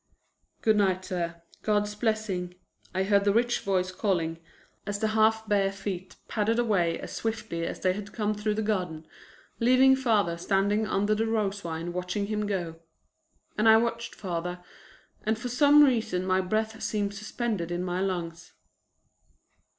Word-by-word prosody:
"Good 220 -1 +4
night, 190 -2 +1
sir. 170 -2 -4 0.2
God's 210 -1 +1
blessing," 210 -5 -2 0.4
I 190 +1 0
heard 200 0 +3
the 200 - +3
rich 240 +3 +2
voice 185 -2 0
calling 170 -4 -1 0.5
as 205 0 -1
the 220 +1 0
half 220 0 +2
bare 200 -2 +2
feet 195 -2 -6
padded 220 +1 0
away 190 -8 +1
as - - -7
swiftly 215 -7 -3
as - - -5
they 185 -1 +2
had 205 +1 -7
come 215 -2 -1
through 210 0 -1
the 220 - -1
garden, 180 -7 -2 0.5
leaving 255 +3 +6
father 215 -10 +1
standing 200 +4 +1
under 205 +1 +1
the 220 +1 0
rose 205 -3 -1
vine 165 0 -4
watching 180 +3 -2
him 210 0 -2
go. 175 -5 -3 0.8
And 220 +1 +5
I 220 - +8
watched 235 0 -2
father 180 -1 -4 0.6
and 220 +1 0
for 245 +2 -5
some 290 +4 +6
reason 225 -9 +1
my 185 0 +2
breath 220 +3 -2
seemed 205 -2 -1
suspended 210 -3 -3
in 175 +1 -2
my 180 0 -2
lungs. 175 -3 -4
205 Hz, 160 wpm, -28 LUFS, 180-220 Hz, 0.8 s, I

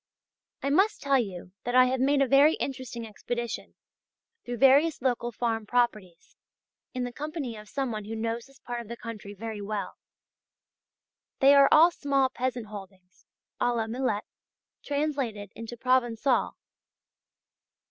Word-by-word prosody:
I 280 - 0
must 390 +8 +3
tell 275 -1 +2
you 185 -5 -5
that 245 0 -2
I 255 0 +8
have 255 +1 0
made 275 +2 +3
a - - 0
very 280 +4 +6
interesting 255 -3 -5
expedition 235 +2 -5 0.7
through 245 0 -5
various 280 +5 +5
local 240 -2 -1
farm 225 -2 -2
properties, 215 -8 -1 0.6
in 255 -1 -3
the 245 - -3
company 295 -5 -5
of 210 -1 -11
some 270 -3 -2
one 215 -2 -5
who 225 +2 -5
knows 230 +2 -3
this 275 0 -20
part 240 -2 -5
of 235 - -12
the 235 +2 -7
country 215 -4 -8
very 220 0 -6
well. 205 0 -4 1.4
They 275 +1 +6
are 280 -1 +7
all 330 +3 +7
small 275 -4 +1
peasant 255 -2 -3
holdings, 190 -3 -12 0.3
à 245 0 +2
la 225 -1 0
Millet, 225 -2 -1 0.6
translated 275 -9 -2
into 230 +1 -8
Provençal. 250 0 +1
245 Hz, 145 wpm, -28 LUFS, 220-275 Hz, 1.4 s, I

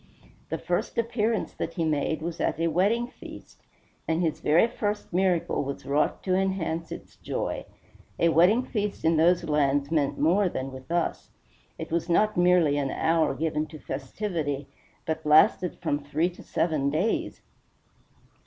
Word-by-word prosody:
The - - -2
first - - -2
appearance 230 -1 0
that - - -5
he 165 -3 0
made 155 0 -1
was 170 0 -4
at - - -1
a 165 0 +1
wedding 200 +9 +2
feast, 245 - -13 0.5
and 160 0 +1
his 165 -3 0
very 160 +7 +4
first 210 -4 -3
miracle 180 -4 +1
was 140 0 -6
wrought 145 +2 0
to 185 - 0
enhance 185 -4 -1
its - - -9
joy. - - -3 0.5
A 170 - +3
wedding 180 +10 +4
feast 210 -7 -3
in 165 0 +4
those 175 +3 +4
lands 145 -1 +1
meant 145 -4 +1
more 180 +5 +3
than 135 -4 -4
with 130 +3 -11
us. 170 -1 -1 0.5
It - - -7
was 170 +1 -1
not 215 +5 +3
merely 175 -4 +4
an 140 -1 -1
hour 160 -1 +1
given 155 0 -1
to 155 0 -10
festivity, 145 0 -4 0.4
but 160 0 -3
lasted 155 +4 +4
from 145 -3 0
three 155 +5 0
to 175 - -14
seven 155 -4 0
days. 175 +10 -1
165 Hz, 160 wpm, -26 LUFS, 150-185 Hz, 0.5 s, very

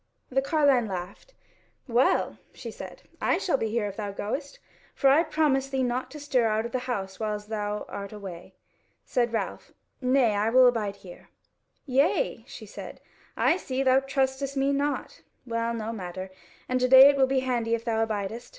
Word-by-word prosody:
The 270 +1 +2
carline 275 -5 +3
laughed: 190 - -7 0.5
"Well," 245 +2 +2 0.2
she - - -7
said, - - -10 0.2
"I - - +2
shall 340 - 0
be 225 - -1
here 225 -1 0
if 200 -1 -6
thou 205 -2 -3
goest; 275 +9 -5 0.4
for 270 -2 +4
I 295 +4 +6
promise 300 -4 +1
thee 265 -1 0
not 250 +1 -2
to 300 +3 -9
stir 260 -5 +1
out 215 +1 0
of 235 - -5
the 255 - -1
house 195 -5 -3
whiles 210 -1 -3
thou 210 -1 -3
art 200 -1 -7
away." 195 -5 -9 0.5
Said 240 -2 0
Ralph: 225 - -4 0.3
"Nay, 255 -3 +3
I 210 +2 +1
will 255 +2 +6
abide 220 -5 +1
here." 185 -3 -14 0.6
"Yea," 280 - +1
she - - -10
said, - - -9 0.4
"I 335 - +3
see: 265 -6 -2
thou 260 0 +5
trustest 270 0 -1
me 270 +1 +2
not. 285 +1 -2 0.2
Well, 230 -1 -1
no 225 -1 -4
matter; 185 -2 -6 0.4
and 255 0 0
to 255 - +2
day 260 +1 +10
it 285 - +5
will 265 -1 +3
be 265 0 +1
handy 240 -3 0
if 230 - -7
thou 225 -1 +1
abidest. 220 +1 -4
245 Hz, 185 wpm, -27 LUFS, 215-270 Hz, 0.6 s, day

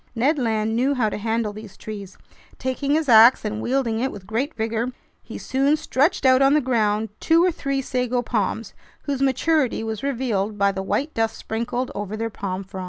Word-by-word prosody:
Ned 280 +6 +2
Land 220 -2 0
knew 265 +4 +1
how 230 -4 +1
to - - -4
handle 225 0 -1
these 210 -2 -11
trees. 200 -3 -8 0.4
Taking 270 +2 -1
his 315 -1 0
ax 230 0 +7
and 215 +1 -3
wielding 245 -3 0
it 265 +3 -1
with 190 - -10
great 235 +9 -2
vigor, 225 +2 -2 0.3
he - - -9
soon 275 +3 +1
stretched 295 +2 +1
out 260 0 +5
on 275 +2 +5
the - - +5
ground 220 -5 0
two 330 +1 +4
or 365 - +3
three 275 -3 -2
sago 250 -1 -1
palms, 225 -1 -2 0.3
whose 275 -2 -3
maturity 275 -2 +1
was 220 -2 -4
revealed 230 -7 -1
by 200 0 +3
the 190 0 -4
white 285 +10 -2
dust 225 0 -1
sprinkled 240 +3 -3
over 205 +1 -5
their 225 +1 -3
palm 195 -1 -4
fronds. 190 0 -9
235 Hz, 195 wpm, -23 LUFS, 215-270 Hz, 0.4 s, ax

